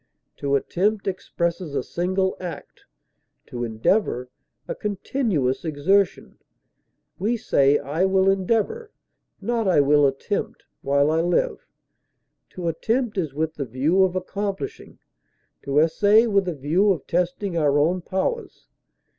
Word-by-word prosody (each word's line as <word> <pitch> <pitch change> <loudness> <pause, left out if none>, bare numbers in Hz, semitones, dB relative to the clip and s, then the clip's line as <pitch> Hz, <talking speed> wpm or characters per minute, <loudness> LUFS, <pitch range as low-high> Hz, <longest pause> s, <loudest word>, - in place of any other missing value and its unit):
To 140 0 0
attempt 195 +9 0
expresses 170 -4 -3
a - - 0
single 190 +2 -1
act; 180 -2 -8 0.6
to 120 0 -5
endeavor, 125 - 0 0.4
a - - -2
continuous 200 - -1
exertion; 175 +5 0 0.8
we 225 +5 0
say 140 - +3
I 160 +7 -1
will 190 0 +2
endeavor 225 - 0 0.5
(not 235 -3 -1
I 180 - +4
will 145 0 +5
attempt) 135 +9 -3 0.2
while 140 +2 +2
I 160 +1 +2
live. 400 - 0 0.9
To 180 -2 -4
attempt 225 +8 -1
is 160 -8 -2
with 160 +1 -1
the 145 -3 -4
view 140 +10 +1
of 185 -1 +2
accomplishing; 200 - -4 0.6
to 140 +1 -2
essay, 205 +8 +4
with 200 -4 +1
a 175 - -2
view 165 +9 +2
of 170 -8 -2
testing 180 +2 -1
our 145 -3 +2
own 170 +5 +2
powers. 190 - -3
180 Hz, 130 wpm, -23 LUFS, 145-200 Hz, 0.9 s, will